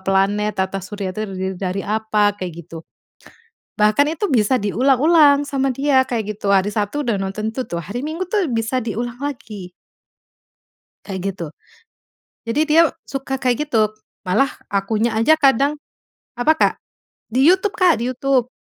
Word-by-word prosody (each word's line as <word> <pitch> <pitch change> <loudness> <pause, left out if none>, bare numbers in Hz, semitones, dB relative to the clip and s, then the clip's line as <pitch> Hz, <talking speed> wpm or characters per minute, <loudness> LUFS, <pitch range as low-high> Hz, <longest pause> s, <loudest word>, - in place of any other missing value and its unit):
planet, 195 +2 +1
tata 190 +1 -1
surya 190 0 -5
itu 215 - -6
terdiri 190 0 -4
dari 190 +1 -2
apa, 215 -1 +1
kayak 185 -3 -5
gitu. 165 0 -9 1.0
Bahkan 215 +6 +3
itu 410 - -1
bisa 235 +1 +3
diulang-ulang 280 - +4
sama 270 -1 0
dia, 270 -1 +3
kayak 215 -4 -3
gitu. 200 -2 0
Hari 195 +1 +3
Sabtu 210 +8 -1
udah 230 -4 +1
nonton 205 +3 -3
itu 255 +2 -3
tuh, 170 - -3
hari 235 +6 -5
Minggu 320 +5 -3
tuh 385 -5 0
bisa 230 +3 -1
diulang 235 +2 -4
lagi. 215 -10 -6 1.3
Kayak 190 -2 -5
gitu. 170 -4 -6 1.0
Jadi 250 +7 +1
dia 315 +2 +6 0.2
suka 270 0 -5
kayak 255 +3 +1
gitu, 215 -6 +2 0.3
malah 210 +9 +2 0.2
akunya 215 +4 0
aja 230 +8 +5
kadang 280 -1 +3 0.6
apa 245 +6 +3
Kak? - - +3 0.6
Di 265 +5 +3
YouTube, 380 +2 +3
Kak, 360 - +4
di 250 - -1
YouTube. 255 -1 0
225 Hz, 150 wpm, -20 LUFS, 200-275 Hz, 1.3 s, dia